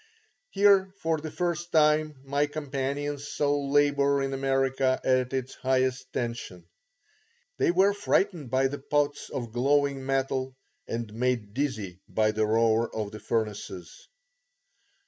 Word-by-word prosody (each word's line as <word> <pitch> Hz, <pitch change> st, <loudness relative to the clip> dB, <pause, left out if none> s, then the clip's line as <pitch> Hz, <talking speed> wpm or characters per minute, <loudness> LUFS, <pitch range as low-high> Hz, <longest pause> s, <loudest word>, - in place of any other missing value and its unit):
Here 195 Hz, -1 st, +4 dB
for 160 Hz, -3 st, 0 dB
the 155 Hz, +1 st, -6 dB
first 175 Hz, +1 st, -2 dB
time 155 Hz, -1 st, +3 dB
my 140 Hz, +2 st, +1 dB
companions 145 Hz, 0 st, -3 dB
saw 145 Hz, 0 st, 0 dB
labour 140 Hz, 0 st, +2 dB
in 135 Hz, 0 st, -2 dB
America 135 Hz, -1 st, +1 dB
at 130 Hz, -1 st, +2 dB
its 130 Hz, -1 st, -3 dB
highest 130 Hz, 0 st, 0 dB
tension. 115 Hz, -8 st, -4 dB, 0.9 s
They -, -, +3 dB
were 190 Hz, +3 st, +4 dB
frightened 190 Hz, -, 0 dB
by 130 Hz, +1 st, +2 dB
the 145 Hz, +2 st, -5 dB
pots 145 Hz, +1 st, -1 dB
of 120 Hz, -5 st, -5 dB
glowing 140 Hz, +2 st, +1 dB
metal 130 Hz, -1 st, -1 dB, 0.3 s
and 115 Hz, -2 st, -4 dB
made 115 Hz, -3 st, -1 dB
dizzy 110 Hz, -10 st, -3 dB
by 110 Hz, -1 st, +2 dB
the 110 Hz, 0 st, 0 dB
roar 115 Hz, +1 st, +2 dB
of 105 Hz, -2 st, -3 dB
the 110 Hz, -, -8 dB
furnaces. 105 Hz, -6 st, -4 dB
135 Hz, 130 wpm, -27 LUFS, 120-145 Hz, 0.9 s, Here